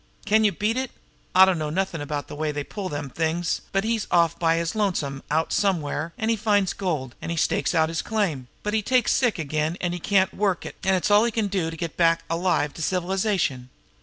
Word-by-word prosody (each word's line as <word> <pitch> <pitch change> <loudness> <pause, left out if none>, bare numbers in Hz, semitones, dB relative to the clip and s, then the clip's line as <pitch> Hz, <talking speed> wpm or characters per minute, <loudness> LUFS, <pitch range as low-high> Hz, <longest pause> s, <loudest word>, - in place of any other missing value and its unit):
Can 215 +1 +4
you 210 - +4
beat 210 +6 -1
it! 260 -1 -1 0.5
I 190 +1 +9
dunno 165 -5 0
nothing 170 -1 -2
about 145 0 -4
the - - -9
way 155 0 -1
they 145 -1 -3
pull 195 +4 -5
them 145 -2 -4
things, 165 +3 -1
but 195 0 +1
he's 225 -1 -1
off 170 -2 +3
by 165 -1 +3
his 165 -1 -1
lonesome 160 -10 -1
out 160 +2 0
somewhere, 170 -5 0
an' 220 - -1
he 230 - +3
finds 205 -3 +1
gold, 155 -10 -3
an' 170 0 -3
stakes 150 +1 +1
out 160 -1 +4
his 165 0 -2
claim, 180 - -1 0.2
but 210 - -2
he 220 - +2
takes 250 +3 +2
sick 245 -6 +2
again 155 +1 -1
an' 175 -1 -1
can't 190 +1 +2
work 195 -3 0
it, - - -7
an' 190 0 +3
it's 185 +2 0
all 205 +1 +6
he 235 - +1
can 215 -2 -1
do 185 -4 -1
to 165 - -8
get 165 -1 -5
back 165 -1 +3
alive 165 -4 +1
to - - -8
civilization. 180 - 0
175 Hz, 225 wpm, -24 LUFS, 160-205 Hz, 0.5 s, I